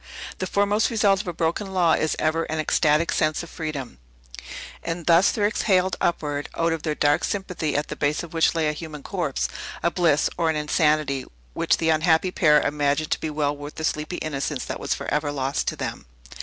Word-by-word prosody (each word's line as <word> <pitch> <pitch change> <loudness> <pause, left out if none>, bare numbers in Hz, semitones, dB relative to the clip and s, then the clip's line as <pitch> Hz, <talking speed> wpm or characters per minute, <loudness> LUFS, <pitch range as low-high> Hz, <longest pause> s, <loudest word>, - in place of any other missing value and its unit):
The 185 - -2
foremost 205 +2 +2
result 205 -5 +3
of 210 - -13
a - - -1
broken 170 +4 -2
law 175 -3 +4
is 155 - +1
ever 160 +1 0
an 160 - -3
ecstatic 155 +1 +2
sense 155 +2 +1
of 170 - -11
freedom. 145 - -5 0.8
And 165 0 -4
thus 170 +3 +5
there 205 - 0
exhaled 190 -3 +2
upward 145 -4 -1
(out 165 0 +2
of 165 - -4
their 155 -1 -2
dark 145 +2 +2
sympathy, 180 -6 -2
at 145 +1 -1
the - - -4
base 145 +4 0
of 170 - -10
which 165 0 +3
lay 160 -2 +1
a 150 - 0
human 150 -2 -8
corpse) 60 +1 -2 0.4
a 170 - +2
bliss, 165 -5 +3
or 165 -1 +2
an 160 - 0
insanity, 150 -3 +1 0.3
which - - +2
the 160 - 0
unhappy 160 +3 +3
pair 150 -4 +5
imagined 145 +1 0
to - - +1
be 160 - -2
well 145 -1 -1
worth 145 +1 -9
the 160 - -6
sleepy 155 +2 -2
innocence 145 -2 -3
that - - -5
was - - -1
forever 150 -1 -2
lost 135 -1 -2
to - - 0
them. - - -5
155 Hz, 205 wpm, -24 LUFS, 150-170 Hz, 0.8 s, thus